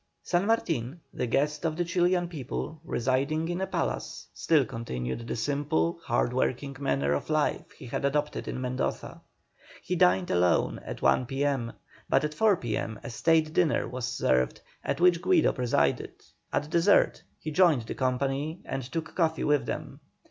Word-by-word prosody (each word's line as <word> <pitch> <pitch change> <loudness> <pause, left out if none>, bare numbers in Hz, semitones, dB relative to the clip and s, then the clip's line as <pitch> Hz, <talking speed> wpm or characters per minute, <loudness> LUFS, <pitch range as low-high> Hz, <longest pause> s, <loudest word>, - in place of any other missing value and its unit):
San 180 +3 +1
Martin, 165 - 0
the 125 - -2
guest 150 +5 0
of 160 -2 -1
the 175 - 0
Chilian 175 +1 +2
people, 155 0 -5
residing 140 +4 0
in 175 +2 -2
a 190 - -1
palace, - - -3
still 155 -5 +3
continued 110 - -5
the - - -2
simple, 145 +6 0
hard 120 +1 0
working 135 +2 -1
manner 70 - +1
of 70 - -3
life 155 -1 0
he - - -12
had 120 - -4
adopted 150 +2 -1
in - - -3
Mendoza. 130 0 -3 0.6
He - - -1
dined 90 0 +3
alone 90 -1 +2
at - - -7
1 125 - +3
P.M., 135 -3 -1 0.4
but - - +3
at 150 0 -2
4 210 +3 +3
P.M. 110 -3 -3
a - - -6
state 160 +4 +2
dinner 165 -3 +2
was 125 0 -4
served 65 - +1 0.2
at - - -2
which 175 -1 +4
Guido 360 -4 +3
presided. 115 - 0 0.4
At 145 +2 -1
dessert 170 +5 +4 0.2
he 155 - -5
joined 155 -6 +4
the - - -5
company 135 +5 -1
and 135 - -3
took 160 +6 -5
coffee 160 -3 +1
with 150 -1 +2
them. - - -5
145 Hz, 165 wpm, -28 LUFS, 120-165 Hz, 0.6 s, which